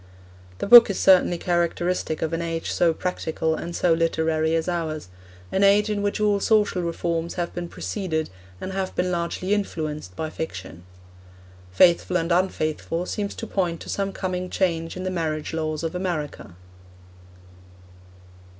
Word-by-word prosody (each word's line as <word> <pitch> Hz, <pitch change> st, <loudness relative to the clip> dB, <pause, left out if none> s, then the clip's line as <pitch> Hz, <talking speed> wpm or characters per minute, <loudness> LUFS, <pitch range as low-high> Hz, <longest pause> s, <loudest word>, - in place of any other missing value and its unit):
The -, -, -3 dB
book 235 Hz, +2 st, +10 dB
is 200 Hz, -, -2 dB
certainly 185 Hz, -2 st, +5 dB
characteristic 175 Hz, -2 st, -1 dB
of 160 Hz, -, -2 dB
an 165 Hz, -, -1 dB
age 165 Hz, -1 st, -3 dB
so 170 Hz, -1 st, +3 dB
practical 160 Hz, -1 st, -2 dB
and 170 Hz, +2 st, -5 dB
so 175 Hz, -, +3 dB
literary 160 Hz, -1 st, +1 dB
as 165 Hz, +1 st, -1 dB
ours, 160 Hz, -, -3 dB, 0.4 s
an 195 Hz, -, +1 dB
age 205 Hz, +2 st, +4 dB
in 205 Hz, -1 st, -1 dB
which 205 Hz, +1 st, -1 dB
all 205 Hz, -1 st, +2 dB
social 210 Hz, -3 st, +2 dB
reforms 170 Hz, 0 st, -2 dB
have 175 Hz, -1 st, -3 dB
been 175 Hz, -1 st, -5 dB
preceded 160 Hz, -, -3 dB, 0.3 s
and 190 Hz, -, -5 dB
have 190 Hz, -1 st, -3 dB
been 180 Hz, 0 st, 0 dB
largely 175 Hz, +3 st, -1 dB
influenced 155 Hz, -, -3 dB
by 155 Hz, -1 st, -4 dB
fiction. 90 Hz, -, -7 dB, 0.9 s
Faithful 175 Hz, -, +4 dB
and 165 Hz, 0 st, -2 dB
Unfaithful 170 Hz, -1 st, 0 dB
seems 200 Hz, +1 st, -3 dB
to -, -, -5 dB
point 180 Hz, -6 st, -1 dB
to -, -, -9 dB
some 195 Hz, 0 st, -1 dB
coming 185 Hz, -1 st, -3 dB
change 165 Hz, -3 st, -1 dB
in 185 Hz, -, -5 dB
the 185 Hz, -, -2 dB
marriage 160 Hz, -3 st, -2 dB
laws 155 Hz, -1 st, -2 dB
of 165 Hz, -, -2 dB
America. 155 Hz, -, -4 dB
170 Hz, 155 wpm, -24 LUFS, 160-185 Hz, 0.9 s, book